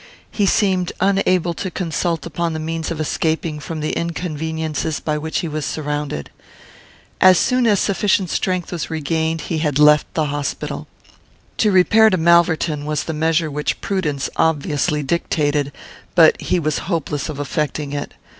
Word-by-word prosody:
He 205 -2 +1
seemed 185 -4 +2
unable 185 -3 +2
to 185 - -4
consult 165 -2 -2
upon 170 0 -2
the 155 - -3
means 160 +1 -3
of 165 -2 -4
escaping 160 0 -1
from 155 +1 -6
the 155 - -1
inconveniences 160 -2 -3
by 150 -1 -2
which 160 +1 -2
he 170 - -3
was 155 -1 -3
surrounded. 145 - -3 0.9
As 185 -1 +7
soon 250 +3 +2
as 205 -3 +3
sufficient 195 -2 +1
strength 185 -2 -1
was 175 -3 -4
regained, 160 +1 -1
he 160 +1 -3
had 150 -3 0
left 150 0 +5
the 155 - +1
hospital. 145 0 -4 0.7
To 215 - +3
repair 215 +4 +5
to 185 - +1
Malverton 160 -3 +3
was 150 -1 -1
the 160 - -4
measure 160 0 +1
which 150 +1 -2
prudence 150 -8 -2
obviously 150 -1 +1
dictated; 145 -1 0 0.4
but 165 -3 +6
he - - 0
was 155 -2 -1
hopeless 150 -4 -2
of 145 -2 -6
effecting 145 0 -2
it. 145 0 -5
160 Hz, 155 wpm, -20 LUFS, 150-175 Hz, 0.9 s, As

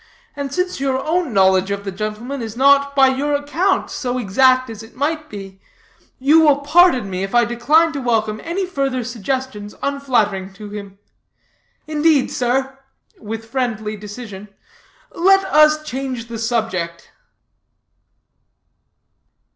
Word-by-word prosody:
And 280 -2 -4
since 360 +2 -2
your 270 -1 0
own 325 +2 -1
knowledge 190 -1 +3
of 200 0 -3
the 195 - -3
gentleman 215 +7 -5
is 225 0 -6
not, 280 +1 +4
by 270 -1 +6
your 285 +2 0
account, 320 +7 0
so 250 -1 -3
exact 255 +4 +3
as 225 -2 -8
it 225 +1 -14
might 305 +3 -2
be, 195 -2 -10 0.6
you 290 +5 +5
will 290 -3 +4
pardon 295 - +4
me 185 -1 -4
if 195 +4 -3
I 240 0 +5
decline 300 +8 +2
to 280 - -4
welcome 220 -3 0
any 360 +4 -2
further 275 -7 -2
suggestions 240 -2 -4
unflattering 225 -9 0
to 205 +1 -10
him. 200 -2 -8 0.9
Indeed, 305 -2 +2
sir," 265 +2 -1 0.4
with 225 +1 -6
friendly 225 -3 -3
decision, 210 -1 -9 0.6
"let 390 +2 +3
us 305 0 +4
change 255 -4 -5
the 230 -1 -6
subject." 220 -8 -2
255 Hz, 135 wpm, -19 LUFS, 215-280 Hz, 0.9 s, by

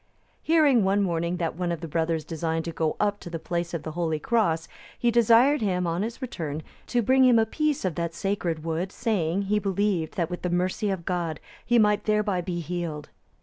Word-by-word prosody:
Hearing 300 -8 +4
one 195 +1 +2
morning 170 -1 -1
that 165 -3 -2
one 175 0 -2
of 170 - -2
the 165 - -5
brothers 160 0 -1
designed 165 0 -2
to 165 - -3
go 160 -1 -1
up 205 -1 +1
to - - -9
the 170 - -4
place 170 +1 -3
of 170 -3 -4
the 155 - -5
holy 165 -1 -1
cross, 165 -3 +1 0.3
he 240 - +2
desired 235 +4 +5
him, 180 -4 0
on 170 +2 -1
his 230 +5 -4
return, 160 - -4 0.2
to 240 -1 +1
bring 260 +4 +4
him 250 -2 +6
a 225 - +4
piece 300 +1 -1
of 185 - 0
that 170 0 -3
sacred 180 -6 -2
wood, 165 +3 -2
saying, 200 -6 0
he 210 +2 +1
believed 195 -4 -1
that 170 -1 -1
with 175 - -4
the 180 - -1
mercy 185 +4 0
of 190 -4 -3
God 170 -4 -2 0.2
he 240 - +2
might 210 -2 +3
thereby 210 -3 +1
be 175 -1 -3
healed. 165 -2 -4
180 Hz, 215 wpm, -26 LUFS, 165-210 Hz, 0.3 s, him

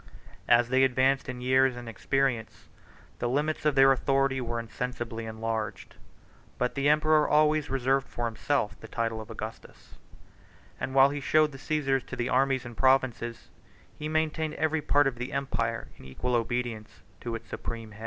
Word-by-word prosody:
As 120 0 +4
they 130 +1 +4
advanced 130 +1 +2
in 125 -1 -6
years 130 0 +3
and 120 -1 -8
experience, 120 0 -2 0.5
the 120 - -1
limits 150 +4 -1
of 150 -2 +3
their 135 0 +7
authority 135 0 +1
were 120 -1 -3
insensibly 115 -1 -5
enlarged: 110 -1 -4 0.6
but 125 0 0
the 140 +1 +1
emperor 155 0 +4
always 150 0 +3
reserved 135 +1 +1
for 120 - -4
himself 115 -2 -1
the 110 - -10
title 115 -1 -2
of 110 - -11
Augustus; 110 +1 -9 0.8
and 130 +2 -4
while 135 +1 +6
he 145 - -3
showed 155 +3 +3
the 135 - -11
Cæsars 135 -3 0
to - - -6
the 120 +1 -2
armies 135 0 +2
and 120 -1 -8
provinces, 130 -3 +1 0.4
he 150 0 -5
maintained 155 0 -1
every 160 0 0
part 145 0 +3
of 135 -3 -1
the 125 - -4
empire 140 -1 -2
in - - -16
equal 95 - -4
obedience 120 -2 -2 0.2
to 115 -1 -4
its 115 - -8
supreme 115 -2 -6
head. 105 - -14
130 Hz, 170 wpm, -28 LUFS, 115-140 Hz, 0.8 s, their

